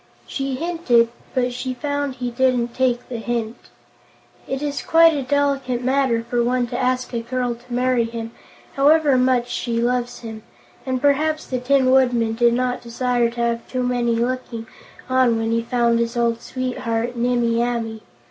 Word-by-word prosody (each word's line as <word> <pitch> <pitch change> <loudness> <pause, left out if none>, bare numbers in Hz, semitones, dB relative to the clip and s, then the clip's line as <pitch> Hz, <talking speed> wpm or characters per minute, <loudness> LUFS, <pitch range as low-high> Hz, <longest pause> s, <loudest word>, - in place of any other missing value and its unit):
She 270 -1 -3
hinted, 260 -7 +2 0.3
but 250 -1 +1
she 255 +1 -4
found 285 0 -2
he 250 -1 -4
didn't 245 -1 +1
take 250 -2 0
the 245 - -5
hint. 230 -1 -4 0.8
It 270 +2 -3
is 285 -1 -2
quite 330 0 +5
a 285 - -1
delicate 275 -2 0
matter 260 -3 +1
for 240 0 +1
one 245 +1 +1
to 245 - -3
ask 255 0 -1
a 235 - 0
girl 245 +1 -2
to 240 +1 -16
marry 250 -1 +2
him, 230 0 -6 0.4
however 290 0 +4
much 255 -1 +2
she 235 -2 -2
loves 245 0 -1
him, 220 -2 -8 0.5
and 260 -1 0
perhaps 305 +3 +1
the 255 - -3
Tin 260 0 +3
Woodman 245 -4 +3
did 235 +1 +3
not 250 0 -1
desire 240 0 0
to 235 0 -5
have 235 0 -1
too 255 0 -2
many 245 -1 +1
looking 235 -1 -2 0.4
on 255 -3 +3
when 225 0 -1
he 230 0 +1
found 235 0 +1
his 235 +1 -1
old 235 -1 +1
sweetheart, 245 -2 -3
Nimmie 235 -1 +1
Amee. 230 -2 -2
245 Hz, 170 wpm, -21 LUFS, 235-260 Hz, 0.8 s, quite